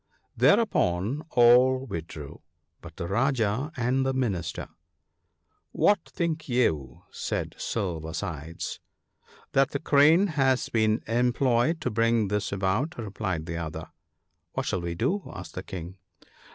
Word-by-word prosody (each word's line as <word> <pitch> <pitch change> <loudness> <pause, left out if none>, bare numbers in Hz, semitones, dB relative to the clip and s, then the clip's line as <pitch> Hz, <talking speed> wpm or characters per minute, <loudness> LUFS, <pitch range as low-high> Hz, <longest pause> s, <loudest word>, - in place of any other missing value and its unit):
Thereupon 110 - +2
all 125 +2 +5
withdrew, 80 - -7 0.4
but 85 -2 -11
the 85 - -4
Rajah 120 - 0
and 125 +2 +1
the 135 0 0
Minister. 110 -9 -2 0.6
" - - -49 0.3
What 205 -2 +4
think 160 -3 -2
you? 80 - 0
" - - -38
said - - -3
Silver 85 -7 -3
sides. 80 -3 -5 0.4
" - - -28
That 135 0 +4
the 140 - -3
Crane 155 +6 +5
has 135 -7 +1
been 110 0 +1
employed 125 +5 +2
to - - -1
bring 115 -1 +2
this 105 +1 -1
about," 100 - -1
replied 95 -7 -3
the 85 0 -4
other. 80 -2 -5 0.3
" - - -51
What - - -2
shall 90 - -1
we 85 0 -3
do? 155 - 0
" - - -22
asked - - -8
the - - -5
King. 90 +1 -8
115 Hz, 145 wpm, -27 LUFS, 90-135 Hz, 0.6 s, all